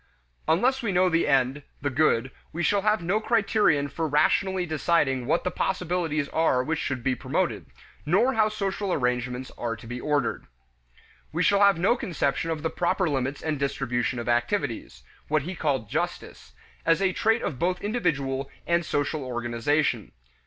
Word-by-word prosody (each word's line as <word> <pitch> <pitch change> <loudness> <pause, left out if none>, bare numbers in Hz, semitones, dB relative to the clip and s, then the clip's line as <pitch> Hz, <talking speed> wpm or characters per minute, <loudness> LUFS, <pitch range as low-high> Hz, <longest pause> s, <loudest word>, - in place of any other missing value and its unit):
Unless 250 +12 +2
we 225 -4 -1
know 185 0 +3
the 165 -1 +2
end, 135 0 +2 0.2
the 145 +1 -2
good, 130 -3 +2 0.2
we 175 +2 -3
shall 200 +3 +2
have 210 -2 +1
no 190 +6 +1
criterion 210 -10 +2
for 160 +3 -3
rationally 180 +5 +2
deciding 150 -6 +1
what 165 +4 +1
the 180 - -1
possibilities 175 -5 -1
are 160 -6 +2
which 160 +3 -1
should 130 -6 -3
be 130 - +2
promoted, 125 - -2 0.4
nor 200 - +3
how 215 -2 +3
social 200 -2 -2
arrangements 125 -2 -1
are 115 -1 -2
to 110 - -13
be 120 +2 -6
ordered. 145 -4 -1 0.8
We - - 0
shall 200 - +4
have 200 -3 +6
no 195 +8 +3
conception 165 - -1
of 160 -2 -3
the 160 - -1
proper 180 +1 0
limits 140 -1 -2
and 155 -3 -1
distribution 130 -3 -1
of 120 0 -5
activities 120 0 -1 0.2
what 155 -2 +1
he 180 +5 -5
called 140 - -1
justice - - -4 0.3
as 165 0 +3
a 190 -1 +1
trait 225 +4 +1
of 130 - -3
both 180 +1 0
individual 140 - -1 0.2
and 170 0 +2
social 145 -1 -1
organization. 120 - -1
155 Hz, 165 wpm, -26 LUFS, 130-185 Hz, 0.8 s, have